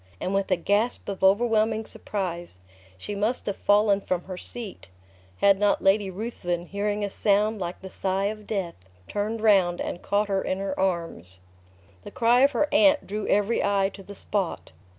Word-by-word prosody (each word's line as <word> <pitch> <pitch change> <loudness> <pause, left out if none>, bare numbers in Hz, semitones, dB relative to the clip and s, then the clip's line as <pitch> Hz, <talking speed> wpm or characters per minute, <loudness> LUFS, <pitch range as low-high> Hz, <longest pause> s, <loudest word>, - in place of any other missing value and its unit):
and 185 - -2
with 195 0 0
a 185 - +4
gasp 205 +7 0
of 195 -1 -5
overwhelming 220 +2 +3
surprise, 175 - -4 0.4
she 205 - -6
must 215 +5 -1
have 200 - -2
fallen 205 -1 +3
from 180 -2 -2
her 185 - -7
seat, 215 - -7 0.5
had 200 -1 +5
not 205 -1 +3
Lady 195 +1 +2
Ruthven, 180 -4 -4
hearing 205 +2 -2
a - - 0
sound 210 +2 +1
like 175 -1 -5
the 190 - -8
sigh 190 +1 -1
of 215 0 -4
death, 190 -5 -2 0.3
turned 215 +2 -3
round, 190 -5 +4
and 175 - -4
caught 205 +1 0
her 195 -1 0
in 185 - -2
her 195 0 -3
arms. 165 - -2 0.7
The - - -8
cry 235 +1 +3
of 275 - +6
her 300 - +2
aunt 295 0 +4
drew 210 +2 -4
every 205 +3 +2
eye 200 -1 +1
to 200 - -10
the 200 +1 -11
spot. 195 -3 -3
200 Hz, 180 wpm, -25 LUFS, 190-215 Hz, 0.7 s, of